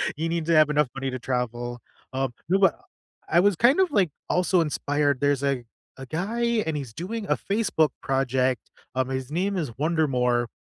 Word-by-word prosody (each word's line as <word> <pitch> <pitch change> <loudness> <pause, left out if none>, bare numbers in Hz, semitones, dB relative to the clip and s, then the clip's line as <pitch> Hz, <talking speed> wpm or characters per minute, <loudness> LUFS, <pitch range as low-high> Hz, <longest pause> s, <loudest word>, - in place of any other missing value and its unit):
you 165 +2 -2
need 165 -2 -1
to 165 - +3
have 155 -1 +6
enough 150 -2 +2
money 135 -1 -3
to 130 - -4
travel. 120 -1 -3 0.3
Um, 130 -2 -1 0.2
no, 190 - +4
but 195 - +3 0.5
I 170 - +4
was 200 -2 +3
kind 250 - +4
of, 375 -2 +3
like, 190 -6 +3 0.2
also 180 0 +3
inspired 145 -2 0
there's 145 -1 +2
a 135 -3 0 0.3
a 135 - -8
guy 220 - 0
and 160 -2 -1
he's 130 -6 -6
doing 205 - -5
a - - +2
Facebook 195 -7 +1
project, 130 -2 +1 0.3
um, 130 0 0
his 130 0 -3
name 190 +4 0
is 135 -9 -4
Wonder 160 +1 +1
More, 125 -2 +1
150 Hz, 190 wpm, -25 LUFS, 130-180 Hz, 0.5 s, have